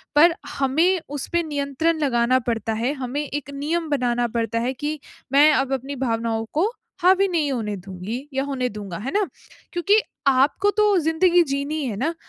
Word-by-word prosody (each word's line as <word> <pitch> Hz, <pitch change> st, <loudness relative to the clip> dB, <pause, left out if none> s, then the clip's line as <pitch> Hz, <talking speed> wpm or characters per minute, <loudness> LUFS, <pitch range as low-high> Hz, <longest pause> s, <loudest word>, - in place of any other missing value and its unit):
पर 330 Hz, +3 st, +7 dB, 0.2 s
हमें 320 Hz, +8 st, +2 dB
उस 285 Hz, -1 st, -4 dB
पे 345 Hz, -, +3 dB
नियंत्रण 295 Hz, +2 st, -1 dB
लगाना 255 Hz, -3 st, +2 dB
पड़ता 225 Hz, -2 st, -1 dB
है, 230 Hz, +5 st, 0 dB
हमें 265 Hz, 0 st, -3 dB
एक 290 Hz, -1 st, -5 dB
नियम 315 Hz, +4 st, -2 dB
बनाना 245 Hz, -4 st, +1 dB
पड़ता 230 Hz, 0 st, 0 dB
है 240 Hz, +2 st, 0 dB
कि 295 Hz, +4 st, -4 dB, 0.3 s
मैं 295 Hz, +2 st, +7 dB
अब 270 Hz, 0 st, +1 dB
अपनी 270 Hz, +2 st, -3 dB
भावनाओं 230 Hz, -3 st, -1 dB
को 330 Hz, +7 st, +2 dB, 0.3 s
हावी 380 Hz, +2 st, +5 dB
नहीं 320 Hz, -6 st, 0 dB
होने 220 Hz, -5 st, -2 dB
दूँगी 195 Hz, +8 st, -6 dB
या 270 Hz, 0 st, 0 dB
होने 265 Hz, -3 st, -2 dB
दूँगा, 200 Hz, -5 st, -7 dB
है 245 Hz, +9 st, -4 dB
ना? 410 Hz, -1 st, +2 dB, 0.5 s
क्योंकि 400 Hz, +5 st, +3 dB, 0.3 s
आपको 280 Hz, +10 st, +3 dB
तो 420 Hz, -2 st, +4 dB
ज़िंदगी 340 Hz, +2 st, +3 dB
जीनी 285 Hz, +1 st, -2 dB
है 230 Hz, -5 st, -3 dB
ना, 300 Hz, +9 st, 0 dB
275 Hz, 175 wpm, -23 LUFS, 240-320 Hz, 0.5 s, पर